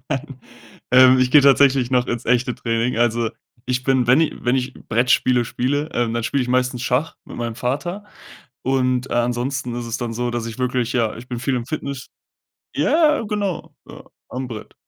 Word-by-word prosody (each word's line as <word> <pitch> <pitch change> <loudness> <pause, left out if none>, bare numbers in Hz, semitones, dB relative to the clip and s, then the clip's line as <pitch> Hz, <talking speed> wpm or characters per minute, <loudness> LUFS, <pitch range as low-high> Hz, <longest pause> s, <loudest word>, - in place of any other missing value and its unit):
Nein. 135 0 -4 0.5
Ähm, 130 0 +7
ich 130 0 +2
gehe 150 - +8
tatsächlich 135 -2 +4
noch 125 -1 +2
ins 120 -1 -3
echte 125 +1 +1
Training. 115 +1 -1
Also, 120 -1 +1 0.4
ich 125 0 -1
bin 130 -3 +2
wenn 130 +6 +5
ich 160 - +1
wenn 125 +2 +2
ich 130 0 -3
Brettspiele 125 +1 +1
spiele, 145 +6 -1
dann 115 -1 -1
spiele 135 +2 0
ich 125 - -5
meistens 125 -1 0
Schach 130 +6 0
mit - - -10
meinem 120 -1 -3
Vater. 175 +11 -3 0.6
Und, 130 -1 0
äh, - - -1
ansonsten 120 +1 -1
ist 120 -1 -4
es 115 0 -3
dann 120 -2 -4
so, 120 +1 -2
dass 120 -1 -3
ich 115 +1 -8
wirklich 125 -1 -1
ja, 115 -4 0
ich 120 - -11
bin 120 -2 -4
viel 130 +1 -1
im 120 -2 -3
Fitness 140 -2 -5 0.7
ja, 305 -3 +3
genau, 205 -4 -3
ja, - - -11 0.3
am 130 +1 -5
Brett. 110 -4 -9
125 Hz, 190 wpm, -21 LUFS, 120-135 Hz, 0.7 s, gehe